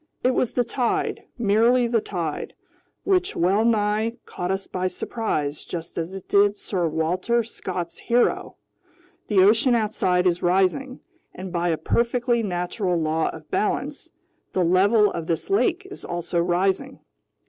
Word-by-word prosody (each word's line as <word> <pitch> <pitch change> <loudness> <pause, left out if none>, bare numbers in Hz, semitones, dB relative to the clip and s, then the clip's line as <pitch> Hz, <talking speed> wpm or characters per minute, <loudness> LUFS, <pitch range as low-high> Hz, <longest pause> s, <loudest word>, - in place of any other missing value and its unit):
"It 255 - +4
was 250 - 0
the 245 - +2
tide, 245 0 -1
merely 235 +3 +3
the 230 -1 +1
tide, 175 -6 -4 0.5
which 375 -1 +1
wellnigh 210 +3 +2
caught 180 0 -5
us 195 +1 -1
by 185 0 -2
surprise 155 -9 -3
just 165 -2 -7
as 170 +3 -4
it 190 - -9
did 205 0 +3
Sir 180 -5 -1
Walter 180 +9 0
Scott's 180 -6 -6
hero! 240 +1 +1 0.7
The 195 -3 +4
ocean 225 +5 +4
outside 195 -5 +1
is 180 -1 +2
rising, 195 +9 +1 0.3
and 185 0 -7
by 175 0 0
a 160 - +1
perfectly 235 +6 +1
natural 180 -1 -1
law 160 0 0
of 155 -1 -10
balance, 285 +9 -2 0.4
the 185 - +2
level 205 +5 +4
of 165 -1 -5
this 165 - -2
lake 390 -2 +2
is - - -9
also 175 0 -2
rising. 190 +9 0
200 Hz, 145 wpm, -24 LUFS, 175-235 Hz, 0.7 s, It